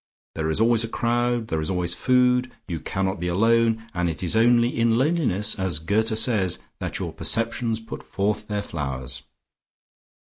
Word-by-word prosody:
There 80 Hz, -1 st, -2 dB
is 80 Hz, -, 0 dB
always 115 Hz, 0 st, +4 dB
a -, -, -2 dB
crowd, 120 Hz, 0 st, 0 dB
there 80 Hz, -1 st, -1 dB
is 75 Hz, -, -3 dB
always 90 Hz, -2 st, +1 dB
food, 125 Hz, +2 st, +2 dB, 0.2 s
you 85 Hz, -3 st, -3 dB
cannot 95 Hz, +3 st, -2 dB
be 90 Hz, -, -2 dB
alone, 115 Hz, +4 st, +2 dB
and 90 Hz, -1 st, 0 dB
it 80 Hz, +3 st, -5 dB
is 90 Hz, -, 0 dB
only 120 Hz, +1 st, +4 dB
in 115 Hz, 0 st, +2 dB
loneliness, 125 Hz, -, +1 dB
as 95 Hz, -4 st, 0 dB
Goethe 110 Hz, +7 st, 0 dB
says, 105 Hz, -, +2 dB, 0.2 s
that -, -, -3 dB
your -, -, -4 dB
perceptions 115 Hz, 0 st, 0 dB
put 110 Hz, -, -8 dB
forth 105 Hz, +2 st, -2 dB
their 105 Hz, -1 st, -2 dB
flowers. 65 Hz, -8 st, -5 dB
110 Hz, 170 wpm, -24 LUFS, 90-115 Hz, 0.2 s, always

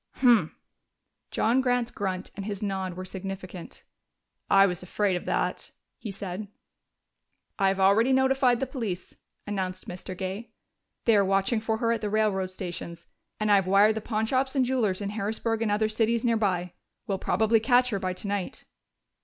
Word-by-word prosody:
"Humph!" 245 Hz, -4 st, +4 dB, 0.8 s
John 240 Hz, +4 st, +2 dB
Grant's 245 Hz, -2 st, 0 dB
grunt 190 Hz, -3 st, -4 dB
and 195 Hz, 0 st, -6 dB
his 205 Hz, -1 st, -4 dB
nod 190 Hz, -3 st, -2 dB
were 185 Hz, +1 st, -6 dB
significant. 190 Hz, -1 st, -7 dB, 0.7 s
"I 195 Hz, 0 st, +7 dB
was 180 Hz, -3 st, -2 dB
afraid 190 Hz, +1 st, 0 dB
of 175 Hz, -, -4 dB
that," -, -, -1 dB, 0.3 s
he 220 Hz, -, -6 dB
said. 195 Hz, +1 st, -6 dB, 1.1 s
"I 195 Hz, -, +4 dB
have 195 Hz, 0 st, +1 dB
already 205 Hz, +6 st, +4 dB
notified 265 Hz, -2 st, +3 dB
the 270 Hz, -, 0 dB
police," 225 Hz, -9 st, -5 dB, 0.3 s
announced 190 Hz, -3 st, -4 dB
Mr. 185 Hz, +1 st, -7 dB
Gay. 195 Hz, +4 st, -5 dB, 0.6 s
"They 230 Hz, -, +5 dB
are 200 Hz, -, +5 dB
watching 195 Hz, +4 st, +1 dB
for 220 Hz, 0 st, -1 dB
her 230 Hz, 0 st, +1 dB
at 230 Hz, -2 st, -1 dB
the 210 Hz, -, -2 dB
railroad 205 Hz, -3 st, +1 dB
stations, 175 Hz, -2 st, -7 dB, 0.3 s
and 215 Hz, -1 st, +1 dB
I -, -, +7 dB
have 190 Hz, -2 st, 0 dB
wired 200 Hz, +3 st, +5 dB
the 220 Hz, -, -4 dB
pawnshops 255 Hz, +6 st, 0 dB
and 260 Hz, -2 st, +3 dB
jewelers 225 Hz, -7 st, 0 dB
in 200 Hz, -, -2 dB
Harrisburg 220 Hz, +2 st, -2 dB
and 225 Hz, -, +1 dB
other 210 Hz, +1 st, +2 dB
cities 225 Hz, +2 st, +1 dB
nearby. 195 Hz, -7 st, +1 dB, 0.3 s
We'll 195 Hz, -5 st, -2 dB
probably 220 Hz, +1 st, +2 dB
catch 245 Hz, +2 st, +3 dB
her 200 Hz, -, -1 dB
by 185 Hz, -1 st, -2 dB
tonight." 200 Hz, 0 st, -4 dB
205 Hz, 170 wpm, -27 LUFS, 190-230 Hz, 1.1 s, I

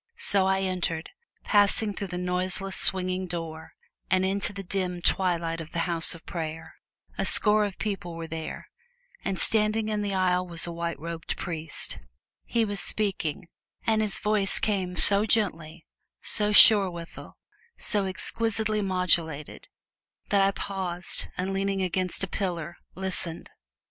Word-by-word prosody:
So 195 Hz, -1 st, +4 dB
I 190 Hz, 0 st, +1 dB
entered, 180 Hz, -4 st, -3 dB, 0.3 s
passing 205 Hz, +1 st, +2 dB
through 200 Hz, -, -5 dB
the 180 Hz, -1 st, -6 dB
noiseless, 185 Hz, +2 st, -1 dB
swinging 185 Hz, 0 st, +2 dB
door, 165 Hz, -2 st, -7 dB, 0.4 s
and 185 Hz, 0 st, +2 dB
into 200 Hz, +2 st, +1 dB
the 200 Hz, -1 st, -8 dB
dim 180 Hz, -1 st, -3 dB
twilight 170 Hz, -2 st, 0 dB
of 160 Hz, -, -11 dB
the 170 Hz, -, -1 dB
house 170 Hz, 0 st, +2 dB
of 165 Hz, -, -15 dB
prayer. 160 Hz, -1 st, -6 dB, 0.5 s
A -, -, +1 dB
score 210 Hz, 0 st, +2 dB
of 200 Hz, -2 st, -6 dB
people 195 Hz, -5 st, -4 dB
were 165 Hz, 0 st, -6 dB
there, 160 Hz, 0 st, -7 dB, 0.6 s
and 195 Hz, -, -2 dB
standing 215 Hz, +1 st, +1 dB
in 210 Hz, -1 st, -1 dB
the 200 Hz, -1 st, -2 dB
aisle 180 Hz, -1 st, +1 dB
was 170 Hz, -1 st, -3 dB
a 170 Hz, -, -5 dB
white 170 Hz, 0 st, -4 dB
robed 165 Hz, 0 st, -6 dB
priest. 160 Hz, -3 st, -4 dB, 0.5 s
He 230 Hz, -1 st, 0 dB
was 205 Hz, -1 st, -3 dB
speaking, 195 Hz, -4 st, +1 dB, 0.4 s
and 220 Hz, -1 st, +2 dB
his 215 Hz, -2 st, -1 dB
voice 210 Hz, -2 st, +1 dB
came 190 Hz, -4 st, -1 dB
so 200 Hz, +3 st, +7 dB
gently, 170 Hz, -7 st, 0 dB, 0.3 s
so 210 Hz, 0 st, +2 dB
sure 205 Hz, -2 st, +9 dB
withal, 170 Hz, -1 st, -10 dB, 0.4 s
so 205 Hz, -2 st, -1 dB
exquisitely 215 Hz, +2 st, -1 dB
modulated, 175 Hz, -6 st, 0 dB, 0.6 s
that 200 Hz, -1 st, +3 dB
I 195 Hz, -, +4 dB
paused 185 Hz, -3 st, -3 dB
and, 190 Hz, +2 st, -2 dB
leaning 195 Hz, 0 st, -1 dB
against 185 Hz, +1 st, -1 dB
a -, -, -1 dB
pillar, 175 Hz, -3 st, -4 dB, 0.2 s
listened. 185 Hz, -3 st, -5 dB
185 Hz, 150 wpm, -26 LUFS, 170-200 Hz, 0.6 s, sure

